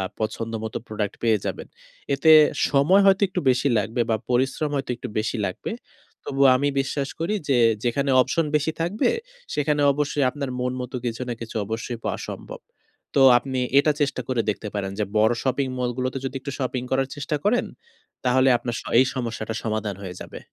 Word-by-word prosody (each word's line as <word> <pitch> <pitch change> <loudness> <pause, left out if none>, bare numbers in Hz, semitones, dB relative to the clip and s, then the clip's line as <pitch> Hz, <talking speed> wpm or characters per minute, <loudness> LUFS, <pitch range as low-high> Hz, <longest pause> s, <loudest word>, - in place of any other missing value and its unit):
আ - - 0 0.2
পছন্দ 115 +1 -3
মতো 110 - -3
প্রোডাক্ট 105 -2 -3
পেয়ে 110 -2 +3
যাবেন। - - -4 0.5
এতে 150 +4 +3 0.4
সময় 155 +8 +4
হয়তো 195 +1 +4
একটু 185 - -2
বেশি 130 +3 +2
লাগবে 110 +4 -2
বা 110 - +3
পরিশ্রম 135 +4 +1
হয়তো 135 -2 -3
একটু - - -7
বেশি 110 +3 -1
লাগবে। 90 - -5 0.5
তবুও 135 -1 +3
আমি 140 +3 +1
বিশ্বাস 135 +1 -2
করি 175 +6 0
যে 130 -3 +3 0.3
যেখানে 135 +3 +1
অপশন 165 +6 +1
বেশি 150 +2 0
থাকবে 180 - +1 0.4
সেখানে 150 0 +1
অবশ্যই 145 0 0
আপনার 140 -1 -5
মন 125 0 -1
মতো 125 +1 -5
কিছু 120 +1 -3
না 120 - -1
কিছু 115 0 -7
অবশ্যই 115 +2 -4
পাওয়া - - -2
সম্ভব। - - -8 0.5
তো 140 - +4 0.2
আপনি 130 0 -3 0.2
এটা 150 +2 +4
চেষ্টা 140 -3 0
করে 130 -3 0
দেখতে 105 +1 -5
পারেন 100 -1 -2
যে 105 - +1
বড় 110 +2 +4
শপিং 135 +1 0
মলগুলোতে 125 +1 -2
যদি 135 - -4
একটু 140 +1 -6
শপিং 130 -1 -2
করার 135 0 +1
চেষ্টা 145 +1 -2
করেন, 235 +4 +2 0.6
তাহলে 130 +1 +4
আপনার 120 0 -4
স - - -11 0.2
এই 130 - +7
সমস্যাটা 115 -3 -4
সমাধান 110 -2 -2
হয়ে 90 -2 -6
যাবে। - - -8
130 Hz, 185 wpm, -24 LUFS, 115-140 Hz, 0.6 s, এই